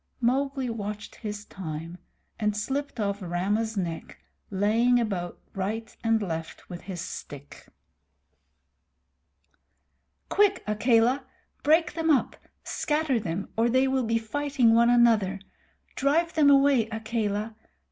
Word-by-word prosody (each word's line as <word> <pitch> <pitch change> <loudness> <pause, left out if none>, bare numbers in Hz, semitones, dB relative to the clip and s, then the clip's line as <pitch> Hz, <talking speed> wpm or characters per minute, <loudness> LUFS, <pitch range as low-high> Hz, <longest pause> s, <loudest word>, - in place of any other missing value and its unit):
Mowgli 270 +2 0
watched 210 -3 -5
his 210 -1 -6
time, 165 -1 -7 0.4
and 210 -1 0
slipped 270 +4 -3
off 200 -1 -1
Rama's 200 +5 -1
neck, 170 -4 -4 0.3
laying 225 +5 +3
about 190 -7 -2
him - - -34 0.2
right 225 +4 -3
and 225 -1 +3
left 165 -3 -5
with 175 - -7
his 180 -1 -7
stick. 145 -5 -9 2.6
"Quick, 400 -2 +2
Akela! 235 +4 +2 0.3
Break 315 +2 +3
them 325 0 -1
up. 285 -5 +2 0.3
Scatter 300 -5 0
them, 180 0 -4
or 230 +2 +2
they 260 +2 +3
will 265 -1 +1
be 230 0 +2
fighting 255 +1 +1
one 235 +1 +5
another. 225 -5 +4 0.5
Drive 320 +5 +1
them 300 -3 +5
away, 275 -5 +4
Akela. 220 -1 -2
225 Hz, 120 wpm, -27 LUFS, 200-265 Hz, 2.6 s, one